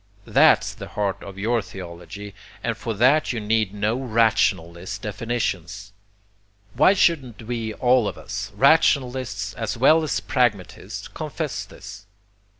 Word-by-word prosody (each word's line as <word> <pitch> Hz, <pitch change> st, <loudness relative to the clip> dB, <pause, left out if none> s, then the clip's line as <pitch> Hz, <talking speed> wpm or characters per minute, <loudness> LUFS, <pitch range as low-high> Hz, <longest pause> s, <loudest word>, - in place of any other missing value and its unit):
THAT'S -, -, +4 dB
the -, -, -9 dB
heart 100 Hz, -1 st, -2 dB
of 100 Hz, -1 st, -10 dB
your 115 Hz, +4 st, +1 dB
theology, 95 Hz, +2 st, -9 dB, 0.3 s
and 115 Hz, -1 st, -1 dB
for 115 Hz, 0 st, -4 dB
that 130 Hz, +8 st, +3 dB
you 120 Hz, -, -3 dB
need 110 Hz, -1 st, 0 dB
no 105 Hz, +2 st, -1 dB
rationalist 100 Hz, -6 st, 0 dB
definitions. 105 Hz, -3 st, -3 dB, 0.8 s
Why 195 Hz, -, +5 dB
shouldn't 135 Hz, -, +1 dB
we 115 Hz, -1 st, -4 dB
all 125 Hz, -3 st, +3 dB
of -, -, -5 dB
us, 105 Hz, -, -6 dB
rationalists 130 Hz, -5 st, +2 dB
as 115 Hz, 0 st, -4 dB
well 155 Hz, +7 st, +5 dB
as 155 Hz, -, -1 dB
pragmatists, 115 Hz, -8 st, -1 dB
confess -, -, -4 dB
this? 105 Hz, -, -12 dB
110 Hz, 130 wpm, -23 LUFS, 100-125 Hz, 0.8 s, Why